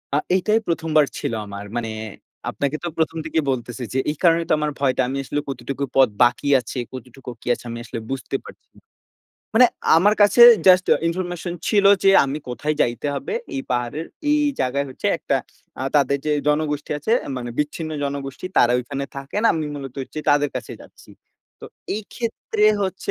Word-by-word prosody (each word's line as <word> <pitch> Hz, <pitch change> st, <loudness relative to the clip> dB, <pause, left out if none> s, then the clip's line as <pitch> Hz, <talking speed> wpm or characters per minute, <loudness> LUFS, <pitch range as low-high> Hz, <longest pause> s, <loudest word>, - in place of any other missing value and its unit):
আ -, -, +4 dB, 0.2 s
এটাই 215 Hz, +4 st, +2 dB
১ম 165 Hz, -1 st, -1 dB
বার 150 Hz, -, +6 dB
ছিল -, -, -3 dB
আমার। 100 Hz, 0 st, -8 dB
মানে 120 Hz, -2 st, -2 dB, 0.6 s
আপনাকে 140 Hz, +1 st, -2 dB
তো 175 Hz, -, -2 dB
১ম 160 Hz, 0 st, 0 dB
থেকেই 160 Hz, -1 st, 0 dB
বলতেছি 120 Hz, -1 st, -4 dB
যে, -, -, -1 dB
এই 150 Hz, -, -3 dB
কারণেই 170 Hz, -1 st, +4 dB
তো -, -, +4 dB
আমার 150 Hz, 0 st, -1 dB
ভয়টা 130 Hz, -2 st, +2 dB
আমি 135 Hz, +2 st, -3 dB
আসলে 145 Hz, -, -2 dB
কতটুকু 135 Hz, +2 st, -4 dB
পথ 135 Hz, -2 st, +6 dB
বাকি 120 Hz, +3 st, +1 dB
আছে, 125 Hz, +1 st, -7 dB, 0.2 s
কতটুকু 130 Hz, +1 st, -10 dB
কি -, -, -14 dB
আছে, 120 Hz, -, -8 dB
আমি 115 Hz, 0 st, -5 dB
আসলে 115 Hz, -, -6 dB
বুঝতে 135 Hz, -, -4 dB
পারছি -, -, -14 dB
না। -, -, -19 dB, 0.7 s
মানে 250 Hz, +3 st, +8 dB, 0.3 s
আমার 205 Hz, +6 st, +4 dB
কাছে 205 Hz, +4 st, +4 dB, 0.3 s
জাস্ট 185 Hz, 0 st, +6 dB
আ -, -, -1 dB
ইনফরমেশন 175 Hz, 0 st, -3 dB, 0.2 s
ছিল 205 Hz, -2 st, +3 dB, 0.2 s
যে, 195 Hz, -, +7 dB
আমি 140 Hz, +2 st, -3 dB
কোথায় 145 Hz, +6 st, -2 dB
যাইতে 120 Hz, +4 st, 0 dB
হবে। 140 Hz, -, -4 dB, 0.2 s
এই -, -, -1 dB
পাহাড়ের 125 Hz, +7 st, -2 dB, 0.2 s
এই 300 Hz, -, +3 dB, 0.2 s
জায়গায় 135 Hz, +2 st, 0 dB
হচ্ছে 130 Hz, -, -5 dB
একটা -, -, -1 dB, 0.5 s
আ -, -, -2 dB
তাদের 140 Hz, -1 st, +2 dB
যে 150 Hz, -, +1 dB, 0.2 s
জনগোষ্ঠী 150 Hz, -1 st, -1 dB
আছে 220 Hz, +10 st, -1 dB
আ -, -, -7 dB
মানে 120 Hz, -1 st, -5 dB
বিচ্ছিন্ন 150 Hz, +2 st, -2 dB
জনগোষ্ঠী, 140 Hz, 0 st, -5 dB
তারা 120 Hz, -, +5 dB
ঐখানে 140 Hz, +3 st, -4 dB
থাকেন। 140 Hz, +10 st, -4 dB
আমি 160 Hz, -1 st, -2 dB
মূলত 135 Hz, -3 st, -7 dB
হচ্ছে 155 Hz, -, -8 dB
তাদের 145 Hz, 0 st, +3 dB
কাছে 120 Hz, -, -6 dB
যাচ্ছি। -, -, -17 dB, 0.5 s
তো -, -, -9 dB, 0.3 s
এইক্ষেত্রে 220 Hz, 0 st, -3 dB, 0.2 s
হচ্ছে 190 Hz, -1 st, -3 dB
145 Hz, 185 wpm, -22 LUFS, 130-170 Hz, 0.7 s, মানে